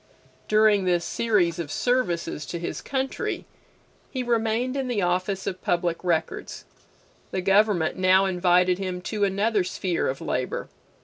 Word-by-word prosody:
During 215 -2 +4
this 175 -2 +1
series 190 -7 +1
of 155 -4 -4
services 175 -11 0
to 170 - -4
his 170 - -4
country, 265 -1 -3 0.6
he 260 -2 -3
remained 235 +2 0
in 270 -2 -1
the 225 -6 0
office 185 +2 -1
of 185 - -4
Public 175 0 -1
Records. 180 - -2 0.6
The 185 - -2
government 195 -3 +3
now 185 +1 +4
invited 180 0 +3
him 185 -2 -3
to 205 +2 -1
another 200 +1 +1
sphere 180 -1 -1
of 135 +1 -2
labor. - - -3
190 Hz, 140 wpm, -25 LUFS, 175-220 Hz, 0.6 s, During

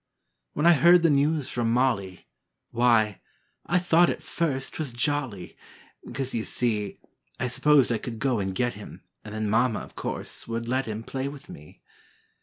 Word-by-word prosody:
When 150 - -1
I 175 - +8
heard 170 +4 +6
the 165 - +5
news 145 0 +1
from 115 -2 0
Molly, 115 -7 0 0.5
Why, 115 -4 +2 0.5
I 175 - +2
thought 175 -1 +4
at - - -4
first 140 -6 -2
't - - -9
was 145 -6 -3
jolly, 120 -7 -2 0.6
'Cause, 135 -1 -3
you 115 - -1
see, 110 -5 -1 0.4
I - - -1
s'posed 135 +1 +3
I 115 - 0
could 115 0 -6
go 125 -1 0
and 95 -1 -3
get 120 +2 0
him 105 - -11 0.2
And 105 0 -8
then 110 0 -2
Mama, 115 +2 +1
course, - - -5
would 115 0 -4
let 130 +1 0
him 110 +1 -5
Play 135 +3 -4
with 140 0 -10
me. 75 +1 -13
125 Hz, 175 wpm, -26 LUFS, 110-145 Hz, 0.6 s, I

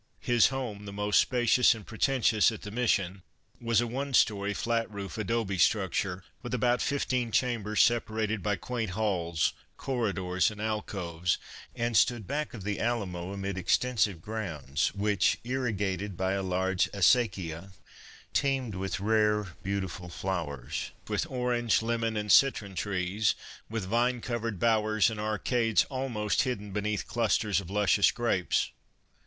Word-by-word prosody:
His 120 -2 +5
home, 120 -6 -4
the 100 - -6
most 105 +1 +2
spacious 125 -1 +4
and 110 -3 -10
preten 130 +4 0
tious 110 0 +5
at 110 - -8
the 105 - -6
Mission, 100 -5 0 0.4
was 115 -1 +2
a - - 0
one 135 +3 -2
story, 100 -2 +3
flat 115 +2 -1
roof 100 -2 -6
adobe 110 -3 -1
structure, 95 -1 +1 0.2
with 125 0 -3
about 125 +1 +2
fifteen 130 -4 0
chambers 110 -4 +2
separated 110 -2 0
by 105 +1 0
quaint 110 +1 -4
halls, 85 -7 0 0.2
corridors 100 -8 0
and 105 -1 -10
alcoves, 90 -5 -2 0.4
and 120 0 -1
stood 115 +2 +3
back 145 +1 -3
of 105 - -8
the 105 0 -2
Alamo 95 -6 -2
amid 100 -1 -3
extensive 105 -5 +1
grounds, 85 -10 -2
which, 100 -1 +2
irrigated 105 -7 -2
by 95 0 0
a 100 0 0
large 95 +1 0
acequia, 95 -4 +2 0.6
teemed 135 -5 0
with 95 0 -3
rare, 105 -1 +2
beauti 100 0 -1
ful 90 0 -8
flowers, 80 -7 -4 0.2
with 110 +10 -1
orange, 125 -3 +1
lemon 115 -1 -1
and 105 -1 -1
citron 110 -8 +4
trees, 95 +2 0 0.3
with 110 -3 -3
vine 120 +4 +1
covered 115 -3 -3
bowers 110 0 +2
and 110 - -6
arcades 110 +2 +1
almost 125 -5 0
hidden 120 -6 -3
beneath 105 +1 -2
clusters 110 -3 +1
of 90 - -11
luscious 100 -1 +4
grapes. 115 -7 0
105 Hz, 145 wpm, -29 LUFS, 95-120 Hz, 0.6 s, His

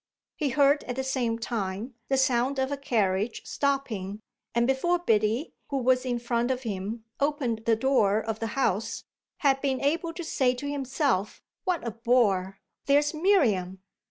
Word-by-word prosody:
He 295 - -1
heard 280 +2 +3
at 245 - -4
the 265 - -2
same 250 -4 0
time 225 0 -3 0.2
the 270 - +2
sound 260 +1 +2
of 265 +1 0
a - - 0
carriage 220 -5 0
stopping, 225 -9 -2 0.4
and 235 0 +3
before 270 +8 +2
Biddy, 225 -3 +1 0.2
who 280 - -1
was 255 0 +2
in 245 -1 0
front 235 0 -1
of 260 0 -1
him, 215 +1 -4 0.2
opened 275 -6 -1
the 225 - +5
door 220 -4 +3
of 220 0 -4
the 225 - -2
house 225 -3 0 0.4
had 270 -3 +3
been 265 -2 0
able 330 +4 0
to 345 - -6
say 260 -5 +1
to 285 +3 -5
himself, 270 - -1 0.3
"What 360 -8 0
a 235 - -2
bore 210 -5 +1 0.3
there's 290 +2 +3
Miriam!" 220 - +2
250 Hz, 165 wpm, -27 LUFS, 220-275 Hz, 0.4 s, the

